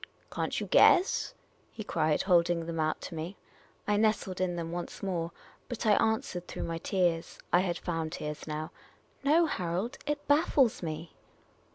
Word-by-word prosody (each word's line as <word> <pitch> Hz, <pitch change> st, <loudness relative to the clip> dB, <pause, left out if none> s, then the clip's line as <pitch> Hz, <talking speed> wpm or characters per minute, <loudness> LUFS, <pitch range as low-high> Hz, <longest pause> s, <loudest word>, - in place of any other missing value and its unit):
"Can't -, -, -2 dB
you -, -, -3 dB
guess?" 365 Hz, +2 st, +4 dB, 0.4 s
he 220 Hz, -, -7 dB
cried, 155 Hz, -6 st, +1 dB
holding 175 Hz, -2 st, +3 dB
them 165 Hz, -1 st, -4 dB
out 155 Hz, 0 st, 0 dB
to -, -, -7 dB
me. 165 Hz, +4 st, -5 dB, 0.5 s
I 205 Hz, 0 st, +3 dB
nestled 210 Hz, -4 st, +1 dB
in 180 Hz, -1 st, 0 dB
them 165 Hz, -1 st, -4 dB
once 175 Hz, +2 st, -6 dB
more; 175 Hz, -3 st, -2 dB, 0.4 s
but 240 Hz, -2 st, -4 dB
I 215 Hz, -, +5 dB
answered 205 Hz, -5 st, +1 dB
through -, -, -5 dB
my 165 Hz, 0 st, -3 dB
tears 175 Hz, -3 st, 0 dB
— -, -, -33 dB
I 175 Hz, -, +7 dB
had 180 Hz, -2 st, 0 dB
found 165 Hz, -3 st, -3 dB
tears 150 Hz, +1 st, -5 dB
now 155 Hz, 0 st, -4 dB, 0.3 s
— -, -, -35 dB
"No, 315 Hz, +4 st, +5 dB
Harold; 190 Hz, -, -2 dB
it 295 Hz, 0 st, -2 dB
baffles 290 Hz, -5 st, +3 dB
me." 160 Hz, 0 st, -5 dB
175 Hz, 175 wpm, -30 LUFS, 165-215 Hz, 0.5 s, I